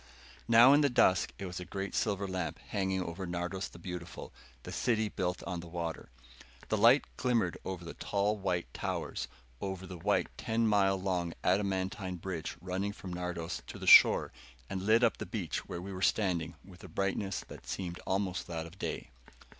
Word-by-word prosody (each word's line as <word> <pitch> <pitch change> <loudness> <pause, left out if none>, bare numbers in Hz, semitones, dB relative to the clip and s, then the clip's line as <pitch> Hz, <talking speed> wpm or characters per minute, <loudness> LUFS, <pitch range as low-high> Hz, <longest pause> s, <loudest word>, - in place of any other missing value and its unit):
Now 120 +4 +8
in 145 - +6
the 145 - +4
dusk 95 -7 +4
it 100 - -5
was 90 -1 -5
a - - -5
great 95 +2 -4
silver 100 -2 0
lamp 95 -3 -3
hanging 95 -1 0
over 90 +2 -5
Nardos, 90 +2 -3
the - - -13
Beautiful, 85 -1 -7 0.3
the - - -7
City 110 -3 +1
Built 90 -3 -2
on 90 -2 -3
the 85 - -8
Water. 85 -3 -4 0.6
The - - +2
light - - +6
glimmered 115 -8 +1
over 90 -2 -5
the 85 - -6
tall 100 +1 0
white 95 -4 -2
towers, - - -3 0.3
over 95 -1 -4
the 90 -1 -8
white 100 +4 +1
ten 115 -1 +1
mile 100 -3 +3
long 90 -3 -1
adamantine 95 -1 0
bridge 85 -2 -5
running 95 +3 -2
from 95 -3 -8
Nardos 90 -1 -3
to - - -7
the - - -7
shore, - - +8 0.4
and 95 - -2
lit 115 +3 +5
up 115 - +3
the 110 - -5
beach 95 -4 -3
where 85 - -5
we 100 +1 -6
were 95 - -6
standing, 90 -6 +1
with 90 -2 -14
a - - -8
brightness 95 +2 -1
that - - -11
seemed 90 -2 -4
almost 95 -1 -1
that 80 -2 -4
of 85 +4 -13
day. - - -4
95 Hz, 185 wpm, -32 LUFS, 90-100 Hz, 0.6 s, Now